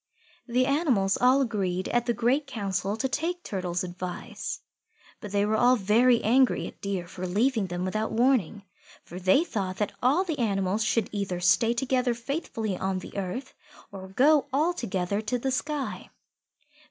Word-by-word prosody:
The 250 +1 +2
animals 260 - +2
all 255 +2 +4
agreed 190 -7 -1
at 240 0 0
the 240 - +2
Great 255 +6 +1
Council 200 -3 -2
to 265 - 0
take 335 +6 -2
Turtle's 180 -3 -3
advice. 180 0 -6 0.6
But 210 -4 -8
they 200 0 +2
were 215 +1 +1
all 245 +3 +5
very 235 +3 +3
angry 255 +4 +3
at - - -10
Deer 195 -3 -3
for 185 0 -6
leaving 220 +2 +1
them 175 +1 -3
without 215 +4 -2
warning, 225 -5 +1 0.4
for 175 - -9
they 190 - +4
thought 195 - -3
that 210 - -1
all 280 +9 +3
the 320 -6 -4
animals 200 -2 0
should 220 0 +1
either 200 -4 -3
stay 225 +6 +3
together 250 -1 +1
faithfully 230 - -3
on 190 +1 -2
the 185 - -9
earth 200 +7 -4 0.4
or 190 -1 -8
go 280 +9 +3
all 310 +6 +2
together 200 - -2
to 220 +3 -1
the 265 +2 -2
sky. 290 +1 -3
220 Hz, 165 wpm, -27 LUFS, 190-255 Hz, 0.6 s, all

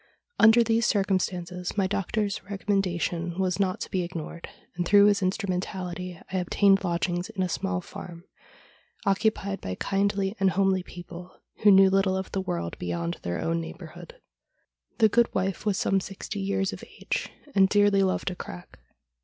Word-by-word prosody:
Under 225 +2 +7
these 225 0 +2
circumstances 180 -2 -1
my 195 - +3
doctor's 200 +1 -1
recommendation 185 -4 -1
was 185 0 0
not 185 -2 0
to - - -5
be 185 - 0
ignored, 170 -1 -6 0.3
and, 175 - -1
through 200 +3 +6
his 205 -1 +3
instrumentality, 180 -2 -3
I - - +1
obtained 195 +2 +3
lodgings 175 +1 -1
in 200 -4 -2
a - - 0
small 195 0 -2
farm, 170 -1 -10 0.8
occupied 200 0 0
by 90 -1 -4
kindly 195 - 0
and 195 -1 +4
homely 190 +1 +2
people, 175 0 -11 0.2
who 210 - +6
knew 195 -1 +7
little 195 -1 +2
of 190 - -5
the 195 - -1
world 85 - -4
beyond 85 -1 -3
their 85 0 -3
own 165 0 -1
neighbourhood. 170 - -10 0.8
The 220 - +6
good 235 +3 +3
wife 190 +2 -1
was 200 -3 +2
some 195 - +2
sixty 195 +2 -6
years 195 0 -1
of - - -9 0.2
age, - - -2 0.2
and 190 -1 +5
dearly 205 -1 +4
loved 190 0 0
a - - -6
crack. 90 - -10
190 Hz, 160 wpm, -27 LUFS, 175-200 Hz, 0.8 s, Under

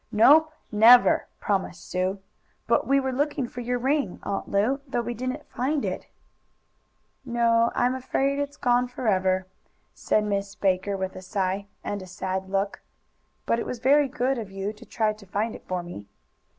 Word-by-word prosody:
"Nope 300 +9 +6 0.2
never!" 230 +3 +6
promised 190 -4 -2
Sue, 185 +2 -1 0.5
"But - - +2
we 275 0 +4
were 265 -1 -1
looking 280 -1 -1
for 245 - -7
your 245 +1 -1
ring, 270 -4 0
Aunt 200 -1 -3
Lu, 225 +8 +1
though 250 -2 -1
we 240 +1 -3
didn't 255 +5 -4
find 275 +4 -1
it." - - -4 1.2
"No, 235 -2 +2
I'm 245 +1 +2
afraid 270 +2 0
it's 285 0 -3
gone 245 0 +2
forever," 190 -6 0 0.5
said 215 - +1
Miss 200 -1 -2
Baker 195 0 0
with 190 0 -4
a 185 - -7
sigh, 190 +1 -2 0.2
and 205 -1 -3
a 185 - -9
sad 190 +1 -4
look. 195 +1 -1 0.6
"But 230 - +1
it - - -3
was 250 - -4
very 275 +4 +4
good 260 -1 -1
of 215 -4 -6
you 195 +2 -4
to 220 +2 -15
try 215 -2 0
to 210 -1 -15
find 215 +4 -1
it - - -12
for 180 -1 -2
me." 105 -13 -9
225 Hz, 175 wpm, -26 LUFS, 195-255 Hz, 1.2 s, Nope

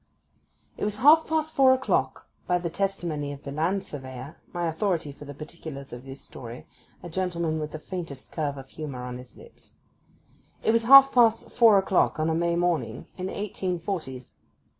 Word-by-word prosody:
IT - - -5
was 210 0 -1
half 300 +7 +6
past 315 0 -1
four 265 -2 +6
o'clock 260 +1 -1 0.2
(by 180 - +3
the 170 -1 -4
testimony 170 -6 -2
of 140 0 -9
the 140 - -6
land 170 +7 0
surveyor, 130 0 -8 0.2
my 175 -1 -2
authority 165 -2 -1
for 145 +1 -12
the 145 - -8
particulars 150 -3 -9
of 120 +2 -9
this 135 0 -9
story, 120 0 -10 0.4
a - - -6
gentleman 170 -2 -2
with 150 0 -4
the - - -5
faintest 165 -5 -7
curve 145 -3 -2
of 135 0 -9
humour 140 -5 -6
on 125 0 -6
his 125 - -14
lips); 470 +1 -15 0.9
it - - +3
was 230 0 +2
half 275 +2 +9
past 230 -2 +3
four 225 -4 +6
o'clock 190 -4 +2
on 155 +1 +1
a - - +1
May 170 +1 +1
morning 170 -8 -1
in 185 0 -4
the - - -6
eighteen 185 -3 -3
forties. 155 -9 -5
170 Hz, 185 wpm, -26 LUFS, 145-200 Hz, 0.9 s, half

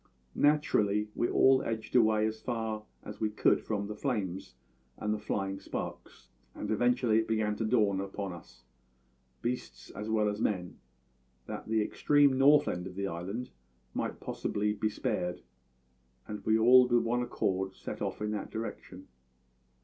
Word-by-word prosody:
"Naturally, 105 -9 +2
we 120 - 0
all 130 0 +5
edged 110 +1 -4
away 110 -3 +4
as 110 0 -3
far 110 -3 -3 0.2
as - - -9
we 110 - +1
could 105 - +3
from 100 -2 -2
the 105 - -5
flames 105 -8 -3 0.4
and 105 0 -1
the 105 - -3
flying 95 -2 -2
sparks, - - -7 0.3
and - - -4
eventually 120 0 +3
it 110 - -1
began 110 -1 0
to 115 - -1
dawn 105 -4 +2
upon 100 -1 -5
us 65 -7 -14
all 60 0 -40
beasts 125 +1 -4
as 105 +2 -6
well 110 -1 +2
as 105 +1 -2
men 90 -6 -2 0.7
that - - -7
the 110 -1 +2
extreme 145 +4 +3
north 145 +2 +6
end 90 +1 -2
of 90 - -10
the 100 0 -2
island 95 +8 -4 0.4
might - - -3
possibly 105 0 -2
be 110 +1 -1
spared, 90 -4 -2 0.8
and 105 -1 -6
we 110 0 +5
all 125 +3 +7
with 120 -1 +3
one 120 +1 0
accord 95 -5 -1
set - - -7
off - - -3
in 105 - -1
that 105 -2 -4
direction. 95 -4 -7
105 Hz, 165 wpm, -31 LUFS, 95-115 Hz, 0.8 s, all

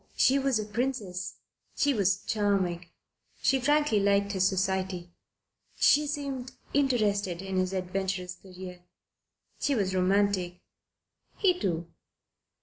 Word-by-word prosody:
She 270 +2 +4
was 270 -3 +2
a 215 - -2
princess. 210 -5 -3 0.4
She 285 -1 +2
was 195 -3 +1
charming. 190 -5 0 0.6
She 270 - +3
frankly 295 -4 +3
liked 200 0 +2
his 190 -1 +2
society. 190 -2 -1 0.6
She 295 +1 +4
seemed 275 -3 -4 0.2
interested 210 -10 +1
in 190 0 -3
his 185 0 +1
adventurous 185 -1 -2
career. 180 0 -10 0.8
She 285 - +1
was 195 -4 0
romantic. 185 -1 +1 0.8
He 385 -3 +4
too. 170 - -1
195 Hz, 115 wpm, -28 LUFS, 185-250 Hz, 0.8 s, She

